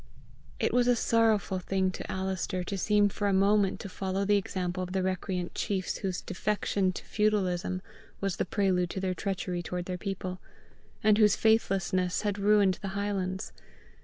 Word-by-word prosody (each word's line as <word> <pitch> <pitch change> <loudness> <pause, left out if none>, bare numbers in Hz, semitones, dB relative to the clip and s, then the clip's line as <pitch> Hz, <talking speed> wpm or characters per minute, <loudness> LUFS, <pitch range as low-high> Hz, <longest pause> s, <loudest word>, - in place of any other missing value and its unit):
It - - +1
was 245 0 +3
a 245 - +5
sorrowful 225 -4 +2
thing 190 0 0
to - - -6
Alister 190 -1 -2
to 195 - -4
seem 205 +2 +3
for 205 +1 -2
a 200 - +2
moment 200 0 +3
to - - -6
follow 190 +1 -2
the 205 +1 +4
example 185 -2 -2
of 180 0 -4
the 190 -1 0
recreant 185 -1 -2
chiefs 190 -3 -2
whose 190 -2 -3
defection 195 0 0
to - - -8
feudalism 185 -4 0 0.4
was 195 -2 -2
the - - 0
prelude 185 -3 +1
to 190 - -4
their 185 -1 -1
treachery 185 -2 -3
toward 180 +1 -4
their 180 -1 -4
people, 185 -2 -4 0.6
and 215 0 +5
whose 210 -1 +6
faithlessness 190 -5 +1
had 205 -1 -1
ruined 200 -2 +4
the 200 - -4
highlands. 190 -2 -2
190 Hz, 170 wpm, -29 LUFS, 185-205 Hz, 0.6 s, whose